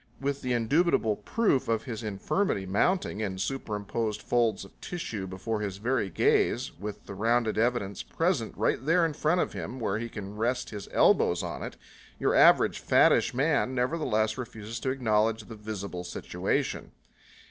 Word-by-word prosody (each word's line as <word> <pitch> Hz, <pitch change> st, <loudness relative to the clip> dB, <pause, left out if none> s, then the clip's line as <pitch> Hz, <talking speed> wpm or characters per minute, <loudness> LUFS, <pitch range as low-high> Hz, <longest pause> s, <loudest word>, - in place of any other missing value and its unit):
With 140 Hz, 0 st, -2 dB
the 125 Hz, -1 st, -1 dB
indubitable 120 Hz, -1 st, +2 dB
proof 205 Hz, -, +1 dB
of 115 Hz, -1 st, 0 dB
his 115 Hz, -3 st, -5 dB
infirmity 105 Hz, -, -1 dB
mounting 105 Hz, -, +1 dB
in 95 Hz, -3 st, -2 dB
superimposed 105 Hz, -1 st, -3 dB
folds 115 Hz, -5 st, +1 dB
of -, -, -19 dB
tissues 110 Hz, -, -5 dB
before 105 Hz, +4 st, -3 dB
his 100 Hz, -2 st, -3 dB
very 115 Hz, -1 st, 0 dB
gaze, 80 Hz, -, +2 dB
with 105 Hz, +1 st, -6 dB
the -, -, -7 dB
rounded 115 Hz, +2 st, +1 dB
evidence 110 Hz, -5 st, 0 dB
presented -, -, -1 dB
right -, -, +1 dB
there 165 Hz, +4 st, +3 dB
in 160 Hz, -, -1 dB
front 160 Hz, +4 st, +1 dB
of -, -, -2 dB
him 130 Hz, -, -6 dB
where 105 Hz, -2 st, -1 dB
he 115 Hz, +1 st, -4 dB
can 105 Hz, -2 st, -7 dB
rest 120 Hz, +4 st, -1 dB
his 105 Hz, -2 st, -7 dB
elbows -, -, +3 dB
on -, -, -5 dB
it, -, -, -6 dB, 0.4 s
your -, -, +2 dB
average -, -, +5 dB
fattish -, -, +4 dB
man 135 Hz, -1 st, +1 dB
nevertheless 125 Hz, -5 st, 0 dB
refuses 115 Hz, -2 st, -6 dB
to 130 Hz, -, -2 dB
acknowledge 110 Hz, -3 st, +1 dB
the 115 Hz, +1 st, -10 dB
visible 100 Hz, -4 st, -6 dB
situation. 90 Hz, -, -2 dB
115 Hz, 160 wpm, -28 LUFS, 105-130 Hz, 0.4 s, average